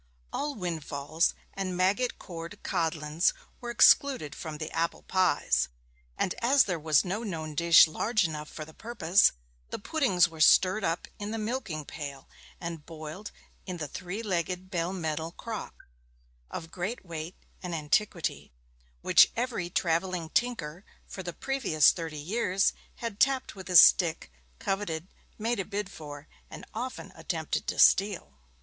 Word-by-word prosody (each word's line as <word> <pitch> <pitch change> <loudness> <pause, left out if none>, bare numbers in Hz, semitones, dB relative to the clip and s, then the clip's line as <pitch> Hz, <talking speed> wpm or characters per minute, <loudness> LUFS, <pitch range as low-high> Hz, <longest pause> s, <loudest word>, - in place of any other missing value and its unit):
All 290 0 -2
windfalls 160 -3 -1 0.2
and 185 -2 -3
maggot 200 +7 +1
cored 170 +2 -8
codlins 160 -2 0 0.3
were 240 - -6
excluded 235 - +4
from 155 -2 -6
the 155 +1 -5
apple 165 +1 -1
pies; 185 -2 +2 0.5
and 185 - 0
as 260 +3 +5
there 180 -4 -2
was 155 0 +3
no 195 +5 -2
known 160 -8 -5
dish 170 +1 +7
large 215 +7 0
enough 150 -2 -4
for 155 - -7
the 160 - -14
purpose, 200 -4 +3 0.4
the - - -4
puddings 220 - +2
were 160 -1 -8
stirred 185 +5 +5
up 165 -1 -1
in 205 0 -4
the 225 - -3
milking 215 - -3
pail, 140 -3 -7 0.3
and 165 -3 -6
boiled 160 +5 -8 0.4
in 180 -1 -4
the 155 -3 -4
three 185 +9 -6
legged 185 -1 -2
bell 175 -1 -1
metal 160 -2 -3
crock, 225 0 -7 0.6
of 165 0 -7
great 185 +6 -4
weight 165 +1 -6 0.3
and 180 -2 -4
antiquity, 165 - -1 0.5
which - - +6
every 230 -7 -2
travelling 170 -1 -1
tinker 190 -9 -1 0.2
for 190 - -8
the 175 -1 -5
previous 175 - +3
thirty 165 -3 -6
years 190 +4 +1 0.2
had 230 -3 -6
tapped 270 -1 +2
with 190 -2 -10
his 180 -3 +9
stick, 165 - +4 0.3
coveted, 180 - -3 0.3
made 230 +1 -1
a - - 0
bid 205 0 -4
for, 145 -4 -9 0.2
and - - -9
often - - -5
attempted - - -3
to - - -2
steal. 185 - +3
180 Hz, 150 wpm, -29 LUFS, 160-205 Hz, 0.6 s, his